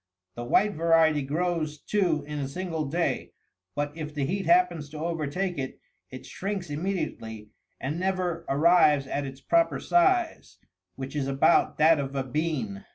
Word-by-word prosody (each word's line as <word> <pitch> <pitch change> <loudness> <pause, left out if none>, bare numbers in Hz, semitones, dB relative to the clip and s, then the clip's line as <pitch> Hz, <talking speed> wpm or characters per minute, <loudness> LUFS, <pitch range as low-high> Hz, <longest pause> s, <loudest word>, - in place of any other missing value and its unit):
64 120 - -6
The 120 - -8
white 210 +1 +4
variety 160 -2 +3
grows, 155 +1 -1
too, 170 -4 0
in 150 0 -5
a 135 - -2
single 165 +1 -3
day, 165 +5 -2 0.4
but 145 0 -2
if 155 -2 -6
the 140 -2 0
heat 190 +6 -2
happens 345 - +3
to 155 - -9
overtake 165 +2 -2
it, 130 -1 -5 0.3
it 130 0 -10
shrinks 190 0 -4
immediately, 145 - -4 0.3
and 145 +6 -3
never 180 -3 -1
arrives 150 -1 +4
at 140 +1 -3
its 135 0 -10
proper 335 -1 +2
size, 350 -1 +1 0.4
which 135 +2 -7
is 140 -2 -1
about 135 0 +3
that 160 0 +5
of 135 0 -4
a 135 - 0
bean. 130 -8 -3
155 Hz, 160 wpm, -27 LUFS, 140-180 Hz, 0.4 s, that